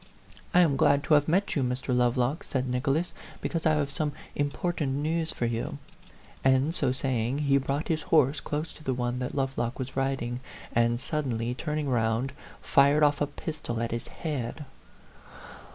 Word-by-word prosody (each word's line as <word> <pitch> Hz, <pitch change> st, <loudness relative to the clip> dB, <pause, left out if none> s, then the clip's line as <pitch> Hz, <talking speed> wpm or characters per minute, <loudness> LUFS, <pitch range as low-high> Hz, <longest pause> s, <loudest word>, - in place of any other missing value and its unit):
'I -, -, +8 dB
am 150 Hz, -6 st, +3 dB
glad 140 Hz, +1 st, +4 dB
to 160 Hz, -, +2 dB
have 145 Hz, -1 st, +5 dB
met 190 Hz, +5 st, +1 dB
you, 145 Hz, -, +2 dB
Mr. 125 Hz, 0 st, -1 dB
Lovelock,' 125 Hz, +7 st, +1 dB
said 130 Hz, -8 st, -2 dB
Nicholas, 135 Hz, +7 st, 0 dB, 0.3 s
'because 165 Hz, -2 st, -1 dB
I 155 Hz, -, +4 dB
have 145 Hz, -2 st, 0 dB
some 150 Hz, +1 st, -1 dB, 0.2 s
important 145 Hz, 0 st, -1 dB
news 160 Hz, +3 st, 0 dB
for 120 Hz, -, -2 dB
you; 115 Hz, 0 st, -2 dB, 0.2 s
T -, -, -24 dB, 0.4 s
and, 130 Hz, +4 st, +3 dB
so 130 Hz, -, +1 dB
saying, 130 Hz, -1 st, 0 dB
he 140 Hz, -2 st, +3 dB
brought 140 Hz, +3 st, -2 dB
his 160 Hz, -1 st, 0 dB
horse 145 Hz, -3 st, +3 dB
close 150 Hz, +2 st, -3 dB
to 155 Hz, -, -15 dB
the 130 Hz, -3 st, 0 dB
one 120 Hz, 0 st, -1 dB
that 125 Hz, -, -3 dB
Lovelock 130 Hz, -3 st, -1 dB
was 130 Hz, 0 st, -5 dB
rid 135 Hz, -1 st, 0 dB
ing, 120 Hz, +1 st, -3 dB, 0.3 s
and, 120 Hz, 0 st, +2 dB
suddenly 125 Hz, -5 st, -1 dB
turning 150 Hz, +2 st, -2 dB
round, 120 Hz, +1 st, +1 dB, 0.3 s
fired 140 Hz, +2 st, +5 dB
off 145 Hz, -1 st, +3 dB
a 145 Hz, -, +2 dB
pistol 145 Hz, -5 st, -5 dB
at 115 Hz, 0 st, -2 dB
his 115 Hz, +1 st, -4 dB
head. 150 Hz, -2 st, -4 dB
135 Hz, 180 wpm, -28 LUFS, 125-150 Hz, 0.4 s, I